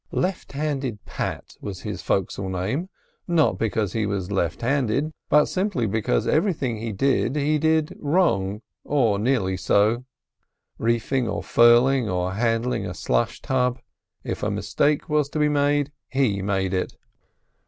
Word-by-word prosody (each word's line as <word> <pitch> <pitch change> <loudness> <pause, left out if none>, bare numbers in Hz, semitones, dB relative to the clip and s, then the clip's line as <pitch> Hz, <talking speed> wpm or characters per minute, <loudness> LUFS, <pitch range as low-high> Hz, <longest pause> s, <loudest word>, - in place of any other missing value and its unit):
"Left 185 -4 -2
handed 135 -7 -3
Pat," - - -5
was 100 -3 -6
his - - -5
fo'cs'le 95 0 -1
name; 105 - -2 0.4
not 170 -4 +2
because 110 -3 -1
he 110 -2 0
was 100 -1 -3
left 85 -1 -1
handed, 135 +3 +1 0.2
but 150 0 +5
simply 185 - -1
because 100 - 0
everything 150 - +1
he 115 +1 -4
did 130 +4 +1
he 150 +1 +1
did 160 0 +1
wrong—or 120 - 0
nearly 105 -6 +1
so. 105 +7 +2 0.8
Reefing 115 +2 0
or 105 - -3
furling, 120 +1 +5
or 90 0 -1
handling 115 +3 0
a - - -6
slush - - -1
tub—if 125 -1 -3
a - - 0
mistake 150 0 0
was 150 -2 +1
to 155 - -5
be 150 0 +3
made, 145 0 +1 0.2
he 125 -8 +1
made 95 -1 -1
it. 95 - -2
120 Hz, 140 wpm, -24 LUFS, 100-145 Hz, 0.8 s, but